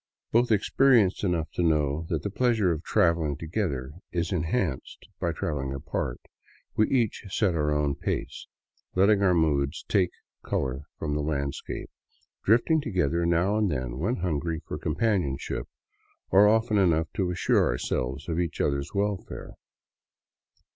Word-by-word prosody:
Both 120 +1 +3
ex 105 -2 +2
perienced 120 -10 +4
enough 85 -5 0
to - - -2
know 75 -1 +1
that 80 -3 -1
the 100 - -3
pleasure 110 -4 +2
of 80 -2 -2
traveling 85 -5 +2
together 80 -7 -3 0.2
is 85 -1 -1
enhanced 80 - -2
by - - 0
traveling 70 -2 -3
apart, 70 -3 -3 0.5
we 110 - +3
each 120 -6 +1
set 95 -1 +1
our 75 -2 0
own 75 -1 +1
pace, - - -4 0.5
letting 100 +2 +4
our 95 -2 +4
moods 75 -2 +1
take 95 -4 +2 0.3
color 65 +1 -2
from 75 -2 -2
the 75 - 0
landscape, 70 -2 -3 0.5
drifting 120 - +3
together 85 - 0
now 90 +5 +2
and 105 -3 +2
then 65 -4 -3
when 110 - 0
hungry 85 -2 -2
for - - -5
companionship, 85 - -1 0.6
or 100 +2 +7
often 110 0 +3
enough 80 -4 +2
to 95 -3 0
assure 90 -1 +2
ourselves 65 +3 -2
of 85 0 -1
each 85 -2 -2
other's 70 +2 -1
welfare. 100 -1 -2
85 Hz, 145 wpm, -27 LUFS, 75-100 Hz, 0.6 s, or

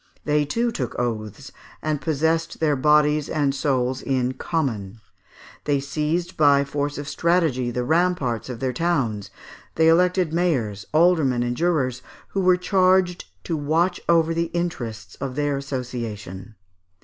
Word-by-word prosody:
They 150 0 +2
too 230 +11 0
took 125 - -4
oaths, 110 -4 -4 0.3
and 155 -2 -2
possessed 160 +1 0
their 150 -2 +2
bodies 150 +1 +3
and 145 -3 +1
souls 130 -2 0
in 130 -2 0
"common;" 115 - -3 0.7
they 145 -1 +2
seized, 150 +5 -2
by 140 -2 +5
force 145 +1 -3
of 145 0 -6
strategy, 160 -8 +1
the 125 +1 -2
ramparts 160 -6 0
of 120 -3 -6
their 130 0 -1
towns; 125 - -1 0.5
they 160 - +4
elected 180 0 +3
mayors, 125 - 0
aldermen, 155 -7 +3
and 120 0 -2
jurors, 135 -6 0 0.3
who 195 - -1
were 185 -1 +4
charged 185 -1 +2 0.2
to 165 - -2
watch 160 +5 0
over 165 -1 +4
the 170 0 -1
interests 120 -11 -4
of 135 -2 -4
their 145 -1 0
association. 115 -7 -6
145 Hz, 140 wpm, -23 LUFS, 125-165 Hz, 0.7 s, by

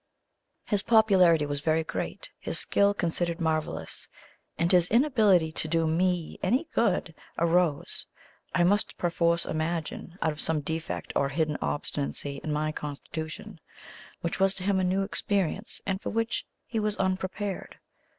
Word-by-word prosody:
His 205 -3 +1
popularity 190 -9 +5
was 145 -1 -3
very 160 +1 +2
great; - - -5
his - - -1
skill 200 0 +4
considered 170 -1 -1
marvellous; 160 -2 -1 0.5
and 170 +1 +2
his 180 -2 +5
inability 215 - +4
to 160 - -2
do 165 +1 +1
ME 175 +1 0
any 255 - +1
good 185 -6 +1 0.2
arose, 170 -3 +1 0.5
I 175 - +4
must 205 +4 +2
perforce 170 -1 +1
imagine, 165 +2 -3
out 160 - +1
of 150 - -6
some 160 -2 +1
defect 160 +3 -4
or 140 - +2
hidden 155 +1 0
obstinacy 75 - -3
in 155 - -2
my 155 +1 0
constitution, 155 +6 -6 0.6
which 170 - -2
was 195 0 +4
to 185 - 0
him 195 0 +2
a - - +1
new 185 +2 +1
experience, 200 0 -1
and 190 0 -1
for - - -3
which 225 +1 -1 0.2
he 225 - -2
was 210 -1 0
unprepared. 190 +1 -2
170 Hz, 150 wpm, -28 LUFS, 160-195 Hz, 0.6 s, popularity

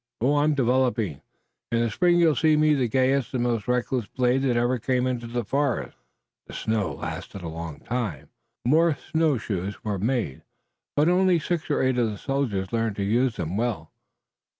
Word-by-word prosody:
Oh, 140 +5 +2
I'm 150 +1 +3
developing! 125 - +1 0.5
In 115 0 +2
the 115 -2 0
spring 175 +7 +3
you'll 165 -3 +4
see 155 +3 +3
me 155 0 +4
the 130 -4 +1
gayest 130 +3 +1
and 120 - +1
most 115 -4 -1
reckless 125 -2 0
blade 125 +1 +1
that 125 -3 +1
ever 120 +1 +1
came 125 +2 0
into 125 -2 -2
the 120 +1 -2
forest." 140 +3 -1 0.5
The - - -10
deep - - -5
snow 105 -8 0
lasted 95 +6 -6
a - - -4
long 80 -1 -7
time. 100 - -4 0.4
More 155 +3 +3
snowshoes 110 - -1
were 105 -4 -2
made, 115 - -1 0.5
but 150 +2 +3
only 180 0 +4
six 165 0 -2
or - - +1
eight 130 -1 +2
of 115 -2 +2
the 105 - -5
soldiers 115 -9 -2
learned 115 -2 0
to 100 - -2
use 120 +4 +1
them 85 +3 -3
well. 110 -9 -2
125 Hz, 185 wpm, -25 LUFS, 105-140 Hz, 0.5 s, you'll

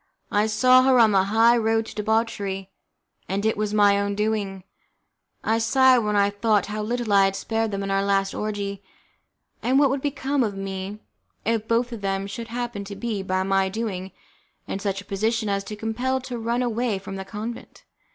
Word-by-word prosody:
I 210 +1 +2
saw 255 +4 +5
her 260 0 +4
on 225 -3 +6
the 190 -1 +3
high 225 +4 +4
road 225 -1 +1
to - - -9
debauchery, 205 -3 -1 0.6
and 200 +3 -1
it 220 - +2
was 210 0 -2
my 205 -1 +4
own 200 0 -1
doing! 205 -3 -2 0.8
I 225 +1 +1
sighed 260 +2 +5
when 210 -2 -1
I 200 0 +3
thought 205 -1 +1
how 210 +1 -4
little 230 0 -1
I 195 -1 +6
had 195 0 0
spared 225 +2 -1
them 200 -1 -3
in 195 - -3
our 195 0 +2
last 195 -1 +1
orgie, 200 -2 -3 0.8
and 260 +2 +2
what 280 -2 +4
would 275 0 -1
become 280 -1 -1
of 205 -3 -2
me 195 +1 -5 0.5
if 225 -1 0
both 235 +1 +1
of 230 -3 -6
them 195 0 -1
should 225 +4 -6
happen 240 -3 -4
to 200 0 -7
be, 220 -1 -3
by 185 0 -1
my 195 0 +1
doing, 190 -3 -4 0.6
in - - -3
such 195 -1 -2
a - - -17
position 220 +2 -1
as 200 0 0
to 210 - -6
be - - -20
compelled 250 +4 -1
to 245 -2 -5
run 235 +2 0
away 235 -2 0
from 195 0 -7
the 190 - -5
convent? 220 +4 -7
215 Hz, 200 wpm, -24 LUFS, 195-230 Hz, 0.8 s, on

